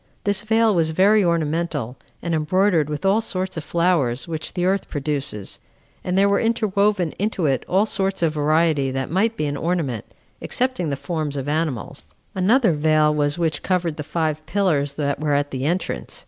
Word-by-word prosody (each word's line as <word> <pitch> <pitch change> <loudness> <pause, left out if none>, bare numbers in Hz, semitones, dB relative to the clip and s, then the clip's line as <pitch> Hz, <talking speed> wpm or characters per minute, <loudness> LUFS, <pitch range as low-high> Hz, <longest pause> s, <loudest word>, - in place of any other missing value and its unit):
This 205 0 +2
veil 220 0 +3
was 165 -3 +2
very 200 +6 +4
ornamental, 160 -6 -1 0.3
and 170 - -2
embroidered 160 0 +2
with 150 +5 -4
all 200 +3 +3
sorts 185 -3 -3
of 160 - -4
flowers 150 -7 +1
which 160 -2 -4
the 180 -1 0
earth 195 +1 0
produces; 140 - -3 0.4
and 180 +1 -1
there 200 +1 +5
were 200 0 +2
interwoven 210 -5 +1
into 205 -4 -1
it 135 -3 +1
all 195 +3 +3
sorts 195 -3 -1
of 160 -2 +2
variety 155 -2 +2
that 135 +2 -3
might 220 +6 +1
be 155 - -1
an 145 0 -2
ornament, 155 - -2 0.4
excepting 255 - -1
the 140 - -2
forms 155 -3 -3
of 135 0 -4
animals. 150 -6 -2 0.3
Another 220 +4 +3
veil 155 0 +3
there 150 - -2
was 145 +1 +1
which 160 -3 -1
covered 175 -4 -1
the 150 - -4
five 155 -1 -2
pillars 155 -9 +1
that 140 -1 -2
were 150 -1 0
at 145 0 0
the 130 0 -3
entrance. 175 +4 -2
165 Hz, 185 wpm, -22 LUFS, 145-190 Hz, 0.4 s, there